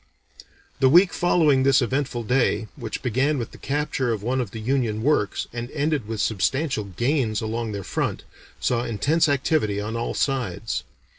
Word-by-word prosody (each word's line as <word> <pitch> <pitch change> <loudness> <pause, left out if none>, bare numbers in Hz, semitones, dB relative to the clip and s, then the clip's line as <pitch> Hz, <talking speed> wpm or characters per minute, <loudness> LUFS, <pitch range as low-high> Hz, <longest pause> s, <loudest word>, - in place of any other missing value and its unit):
The 130 -1 +5
week 175 +6 +6
following 155 -6 +3
this 135 -1 +5
eventful 130 -1 -1
day, 115 -2 +1
which 115 -6 -6
began 135 +5 +1
with 120 - -4
the - - -14
capture 140 -3 -1
of 105 -3 -3
one 130 +3 0
of 120 - -4
the 110 - -7
Union 115 -2 0
works, 135 -8 +1
and 120 0 -5
ended 145 -5 0
with 110 -1 -4
substantial 120 - 0
gains 120 - 0
along 115 0 -3
their 100 -1 -5
front, - - -2 0.4
saw 120 -1 0
intense 145 +9 +1
activity 135 -7 +1
on 110 +2 -4
all 115 0 -2
sides. 110 - -1
125 Hz, 165 wpm, -24 LUFS, 110-140 Hz, 0.4 s, week